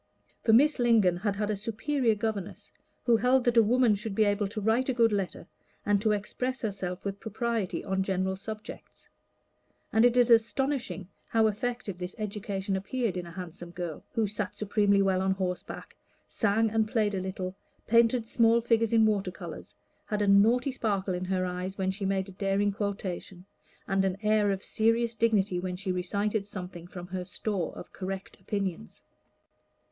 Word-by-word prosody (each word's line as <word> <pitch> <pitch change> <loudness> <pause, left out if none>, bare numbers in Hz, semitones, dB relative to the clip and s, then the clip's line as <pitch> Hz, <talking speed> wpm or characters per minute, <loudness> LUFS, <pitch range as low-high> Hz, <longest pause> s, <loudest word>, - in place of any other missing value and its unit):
For 225 - +3
Miss 280 +6 +5
Lingon 220 -7 +4
had 205 +2 -1
had 210 +1 -1
a - - 0
superior 230 +4 0
governess, 205 -3 -4 0.3
who 235 -2 +5
held 250 +3 +3
that 240 -1 +2
a 230 - +8
woman 240 +1 +4
should 205 0 -4
be 220 - +4
able 205 0 +1
to 215 +2 -5
write 225 +5 +1
a 260 - 0
good 230 -2 +4
letter, 195 -3 -2 0.4
and 205 -1 +2
to 215 0 +2
express 250 +5 -2
herself 190 -4 -3
with 200 0 -3
propriety 225 -2 -2
on 190 0 0
general 190 0 0
subjects. 215 +2 -9 0.8
And 220 - +5
it 245 0 +4
is 245 -1 +5
astonishing 235 -3 +1 0.2
how 225 -1 +3
effective 220 -2 -2
this 180 0 -5
education 200 -2 -3
appeared 200 +1 -2
in 180 -1 -4
a - - -9
handsome 175 -1 -7
girl, 170 -3 -6
who 225 -2 +2
sat 205 -1 -3
supremely 200 -1 +2
well 190 -1 +2
on 190 0 +2
horseback, 185 -2 -5 0.3
sang 220 0 +1
and 220 0 +2
played 215 -2 +1
a 190 - -1
little, 185 0 -4 0.3
painted 230 +1 +4
small 230 0 +4
figures 230 -1 +2
in 225 -1 +6
water 205 -3 +1
colors, 180 - -9 0.3
had 210 -1 0
a - - +1
naughty 230 +7 +4
sparkle 200 -6 -1
in 180 +1 -3
her 185 0 0
eyes 180 +1 -4
when 190 -1 0
she 195 +1 -4
made 190 0 0
a - - -9
daring 195 +1 0
quotation, 190 -2 -4 0.4
and 195 -1 +2
an 190 0 0
air 210 -1 +3
of 195 -1 -1
serious 230 +1 +1
dignity 210 -5 +2
when 180 0 -3
she 190 +1 -3
recited 200 +3 -1
something 180 -4 -7
from 180 -1 -8
her 180 0 -4
store 190 -1 -3
of - - -10
correct 190 0 -5
opinions. 190 - -4
205 Hz, 180 wpm, -29 LUFS, 190-225 Hz, 0.8 s, a